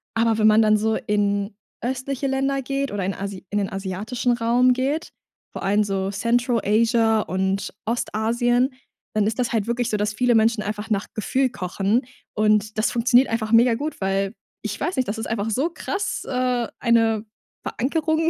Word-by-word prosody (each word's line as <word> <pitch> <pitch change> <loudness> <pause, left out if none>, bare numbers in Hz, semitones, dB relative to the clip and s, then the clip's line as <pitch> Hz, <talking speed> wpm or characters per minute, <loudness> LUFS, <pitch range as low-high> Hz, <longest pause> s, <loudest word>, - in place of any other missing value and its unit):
Aber 225 -1 +2
wenn 215 - +4
man 215 +1 +6
dann 215 -1 +4
so 220 +1 +1
in 205 0 0 0.3
östliche 260 +2 -2
Länder 270 +1 0
geht 275 +1 -2
oder 200 -2 -2
in 195 - -1
asi 195 0 -6
in 205 - 0
den 195 - -2
asiatischen 205 +6 -2
Raum 240 +2 +3
geht, 275 +5 -2 0.4
vor - - -6
allem 205 +2 +3
so 195 -1 -2
Central-Asia 230 0 +2
und 190 +1 -2
Ostasien, 240 +3 +1 0.4
dann 215 -1 +2
ist 220 +3 -2
das 245 -1 0
halt 220 -3 +1
wirklich 235 0 -1
so, 210 - 0
dass 210 0 -1
viele 245 +2 +2
Menschen 225 0 +3
einfach 210 +1 -4
nach 205 -2 0
Gefühl 260 +5 0
kochen, 195 +2 0 0.3
und 215 0 +2
das 215 - +1
funktioniert 245 +2 +4
einfach 220 -1 -2
mega 230 +1 +5
gut, 295 +6 -4
weil 195 +1 0 0.3
ich - - -4
weiß 355 - -1
nicht, 255 - +1
das 205 - -3
ist 225 - -4
einfach 220 -1 -2
so 270 +10 +1
krass, 390 +2 -3
äh, 250 -2 0
eine 225 -2 +2 0.4
Verankerung, 315 +4 0
225 Hz, 175 wpm, -23 LUFS, 210-250 Hz, 0.4 s, man